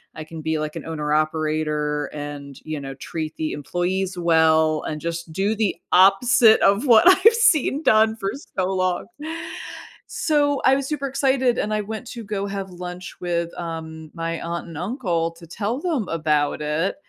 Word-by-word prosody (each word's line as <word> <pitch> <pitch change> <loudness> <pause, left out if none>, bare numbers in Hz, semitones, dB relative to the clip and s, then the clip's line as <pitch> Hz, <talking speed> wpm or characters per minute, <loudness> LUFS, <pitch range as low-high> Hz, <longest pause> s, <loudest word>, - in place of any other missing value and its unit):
I 155 - -6
can 160 0 -9
be, 160 0 -1
like, 150 0 -4
an - - -6
owner 150 -2 -2
operator 155 -1 0
and, 145 -2 -7
you 155 -1 -4
know, 135 -1 -7
treat 155 +3 -5
the 155 -1 -2
employees 180 +5 -2
well 160 -2 +3
and 155 - -4
just 170 0 -4
do 195 +6 0
the 215 -3 0 0.2
opposite 220 +5 +6
of 200 +7 +3
what 230 -3 +7
I've 380 +4 +7
seen 310 - +3
done 220 -2 +4
for 195 -3 -2 0.3
so 185 - +2
long. 185 -1 -1 1.0
So, 290 -3 +1
I 265 - +6
was 275 -1 -2
super 290 -2 -3
excited 265 -2 +1
and 215 - -1
I 215 - 0
went 220 +4 -6
to 235 -2 -7
go 200 -1 -3
have 195 -1 -5
lunch 180 0 -8
with, 170 -1 -2
um, 160 -2 -6
my 165 0 -3
aunt 170 0 -4
and 165 -3 -9
uncle 175 - -1
to 170 0 -14
tell 215 +8 -3
them 295 - -1
about 150 -3 0
it, 155 +5 -1
175 Hz, 175 wpm, -22 LUFS, 155-220 Hz, 1.0 s, what